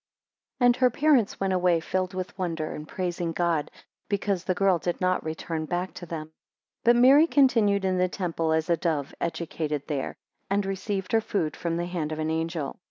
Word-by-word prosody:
AND 245 -1 +5
her 255 -1 +4
parents 265 -4 +2
went 195 -1 0
away 180 -2 +3
filled 185 +2 -2
with 185 +1 -4
wonder, 165 -4 -3
and 150 - -7
praising 175 -2 -3
God, 170 -4 0 0.4
because 200 -3 0
the 185 - 0
girl 190 -2 +3
did 175 +1 -2
not 185 0 +1
return 160 0 -4
back 175 +3 -3
to 175 - -9
them. 155 -1 -5
2 - - -39 0.5
But 240 +1 +6
Mary 270 +6 +7
continued 225 -10 +3
in 185 -1 +1
the 185 0 +2
temple 165 -4 -2
as 160 0 +1
a 170 -1 +2
dove 155 -4 -1
educated 155 -3 -2
there, 140 -4 -3 0.3
and 200 0 +1
received 195 0 -3
her 225 - +4
food 170 -8 -2
from 170 -1 -2
the 175 - -1
hand 170 -4 -3
of 155 - -3
an 155 0 -1
angel. 160 -3 -3
180 Hz, 195 wpm, -26 LUFS, 160-195 Hz, 0.5 s, Mary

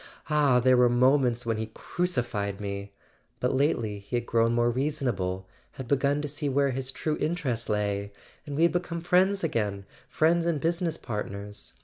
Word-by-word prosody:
Ah, 145 -4 +4
there 130 +1 +4
were 125 0 +5
moments 125 -1 +3
when 115 -1 0
he 110 0 -3
cruci¬ 175 +4 -1
fied 100 -4 -3
me... 100 -1 -5 0.5
but 125 - 0
lately 120 -7 0
he 100 +5 -6
had 120 - -1
grown 115 0 +2
more 120 0 +2
reasonable, 120 -9 -1 0.3
had 130 - -7
begun 140 +2 +1
to - - -2
see 145 0 -2
where 140 0 +2
his 130 +1 -2
true 150 +3 -2
interests 140 -9 -1
lay, 100 -1 -1 0.4
and 145 - -4
we 160 - +2
had 170 - +5
become 175 -1 -2
friends 185 +3 +2
again, 105 -10 -1 0.2
friends 170 +2 +2
and 165 -3 +1
business 170 +2 -1
part¬ 105 -4 -4
ners. 100 +1 -8
125 Hz, 185 wpm, -27 LUFS, 110-150 Hz, 0.5 s, were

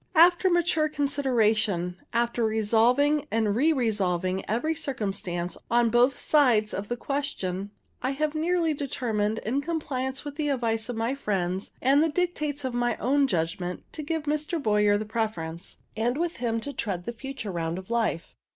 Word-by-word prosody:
After 350 +3 +6
mature 335 -3 +2
consideration, 225 - +1 0.2
after 235 0 0
revolving 235 +7 +3
and 220 -2 +1
re 300 +8 +4
revolving 190 - 0
every 240 +9 +1
circumstance 195 - -3
on 235 -1 +3
both 245 +2 +4
sides 240 -8 +3
of 200 +1 -3
the 240 - -3
question, 205 -10 -3 0.3
I 255 - 0
have 300 +2 -1
nearly 330 0 +1
determined, 225 -7 -1
in 260 +6 0
compliance 270 -5 -3
with 290 0 -6
the 300 -2 0
advice 230 -4 -1
of 245 - -3
my 225 +3 0
friends 190 -7 -2
and 275 +3 +5
the 320 - +3
dictates 300 -4 -1
of 255 - -2
my 240 0 0
own 275 +3 +2
judgment, 175 -1 -2
to 310 - -4
give 315 +1 -2
Mr. 305 +3 -1
Boyer 210 -4 +3
the 215 - -4
preference, 200 -7 -3 0.2
and 240 +4 0
with 340 +1 -1
him 230 -2 -1
to 285 +4 -5
tread 185 -8 -3
the 235 - -4
future 245 -3 -6
round 165 -1 -2
of 190 +4 -8
life. 225 -8 -1
240 Hz, 165 wpm, -27 LUFS, 210-290 Hz, 0.3 s, After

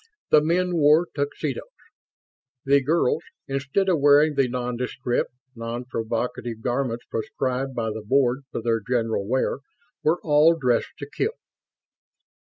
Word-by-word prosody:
The 150 - +7
men 175 +3 +1
wore 155 +3 +5
tuxedos. 140 -2 -3 1.0
The 140 +1 +4
girls, 150 0 +1 0.2
instead 140 +8 -1
of 175 -5 +2
wearing 145 +2 +5
the 135 -2 +2
nondescript, 125 0 -2 0.3
non 115 +1 -5
provocative 115 -1 -3
garments 120 -1 -1
prescribed 130 +3 -3
by 110 -2 -1
the 110 +1 -5
Board 130 +3 +2
for 115 - -4
their 115 -1 +1
general 115 -2 -1
wear, 130 +2 0 0.4
were 165 +3 +2
all 155 +2 +5
dressed 125 -6 0
to 145 - -7
kill. 425 - -2
130 Hz, 130 wpm, -24 LUFS, 120-150 Hz, 1.0 s, The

